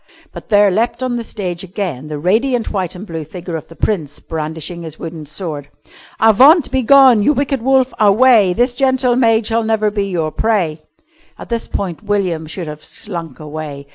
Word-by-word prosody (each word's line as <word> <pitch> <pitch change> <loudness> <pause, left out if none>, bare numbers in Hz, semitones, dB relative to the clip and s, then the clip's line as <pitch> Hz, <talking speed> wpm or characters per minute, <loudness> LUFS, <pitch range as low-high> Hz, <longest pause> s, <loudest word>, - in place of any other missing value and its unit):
But - - -10
there 205 -2 +5
leapt 235 +5 -1
on 255 -1 -1
the 235 - -3
stage 180 -6 -5
again 180 - -5
the 150 -1 -5
radiant 225 - 0
white 185 -4 -2
and 185 +4 -8
blue 165 -5 -5
figure 175 +2 -7
of 160 - -6
the 165 - -14
Prince 160 -10 -2
brandishing 160 +2 -6
his 160 -2 -8
wooden 160 -2 -8
sword. 150 -3 -5 0.5
"Avaunt! 265 - +5
Begone! 260 -2 +5
You 295 - +3
wicked 275 -2 -1
wolf, 265 +1 +2
away! 215 -2 +5
This 245 +4 +1
gentle 260 -1 +2
maid 225 -3 +3
shall 230 +1 +1
never 220 -1 +1
be 205 -1 -1
your 165 -5 -2
prey." 180 -9 0 0.6
At - - -11
this 235 -1 -2
point 180 -5 -4
William 190 -7 -1
should 170 +2 -5
have 150 0 -8
slunk 170 -9 -7
away. 150 -2 -7
200 Hz, 180 wpm, -16 LUFS, 160-235 Hz, 0.6 s, there